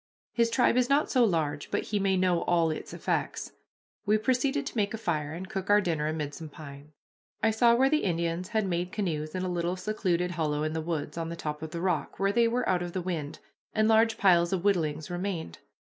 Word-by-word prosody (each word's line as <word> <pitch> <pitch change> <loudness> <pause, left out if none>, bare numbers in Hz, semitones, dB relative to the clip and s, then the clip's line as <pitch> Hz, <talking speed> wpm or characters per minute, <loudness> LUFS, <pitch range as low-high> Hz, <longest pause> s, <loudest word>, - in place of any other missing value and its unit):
His 235 -1 +2
tribe 245 +1 +3
is 250 0 +2
not 285 +2 +2
so 255 -3 +4
large 155 -8 0
but - - -1
he 210 - -1
may 195 -1 +2
know 180 -2 +2
all 170 -2 +2
its 155 - -6
effects. - - -2 0.5
We 215 0 +3
proceeded 265 +5 0
to 290 - -6
make 210 -1 0
a - - -5
fire 155 -9 -2
and 180 +3 -6
cook 195 -1 -5
our 205 0 +6
dinner 160 -6 -1
amid 155 -2 -3
some 160 0 -8
pines. 145 -1 -11 0.5
I 225 - +4
saw 235 +2 +4
where 265 +3 +4
the 305 +2 +2
Indians 170 0 -1
had 220 -1 0
made 180 0 -2
canoes 155 -7 -3
in 185 - -2
a - - -1
little 175 0 -1
secluded 180 -3 -1
hollow 155 -3 -1
in 155 0 -1
the 160 - -2
woods, 155 -1 -3
on 165 0 -3
the 170 - -4
top 150 -2 -5
of 160 - -5
the 170 +2 -5
rock, 180 -5 -1
where 195 0 +2
they 235 +2 +3
were 245 +1 0
out 180 -1 +2
of 175 -1 -5
the 185 - -2
wind, 160 -5 -4 0.4
and 215 0 +3
large 225 0 +4
piles 175 -3 +4
of 185 -2 -1
whittlings 160 -6 0
remained. 175 - -4
180 Hz, 230 wpm, -28 LUFS, 160-215 Hz, 0.5 s, our